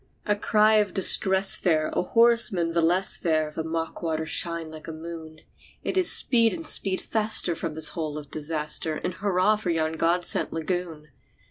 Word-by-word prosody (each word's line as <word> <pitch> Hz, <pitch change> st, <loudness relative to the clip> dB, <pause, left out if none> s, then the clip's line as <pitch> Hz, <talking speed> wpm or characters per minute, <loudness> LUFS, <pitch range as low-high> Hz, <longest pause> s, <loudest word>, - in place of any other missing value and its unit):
A 210 Hz, -, 0 dB
cry 215 Hz, +1 st, +1 dB
of 205 Hz, -3 st, -1 dB
distress 190 Hz, 0 st, +3 dB
there! 155 Hz, -4 st, -1 dB
a -, -, -2 dB
horseman 230 Hz, -4 st, +2 dB
the 170 Hz, 0 st, -1 dB
less 180 Hz, +4 st, +1 dB
there! 155 Hz, -3 st, -2 dB
The 160 Hz, -, -4 dB
mock 165 Hz, 0 st, -6 dB
waters 160 Hz, -2 st, -4 dB
shine 170 Hz, -2 st, -2 dB
like 155 Hz, 0 st, -12 dB
a -, -, -6 dB
moon! 160 Hz, -1 st, -11 dB, 0.4 s
It -, -, -4 dB
is 370 Hz, -2 st, +4 dB
"Speed, 230 Hz, -3 st, +5 dB
and 330 Hz, -, -9 dB
speed 195 Hz, -10 st, +1 dB
faster 215 Hz, -5 st, +3 dB
from 165 Hz, -1 st, -6 dB
this 160 Hz, -, +2 dB
hole 155 Hz, -3 st, -6 dB
of 145 Hz, -2 st, -11 dB
disaster! 155 Hz, +1 st, -1 dB
And 180 Hz, -, -4 dB
hurrah 200 Hz, +2 st, 0 dB
for 205 Hz, -4 st, -6 dB
yon 160 Hz, -1 st, -2 dB
God 175 Hz, +2 st, -1 dB
sent -, -, -1 dB
lagoon!" 165 Hz, -2 st, -6 dB
170 Hz, 185 wpm, -24 LUFS, 160-195 Hz, 0.4 s, Speed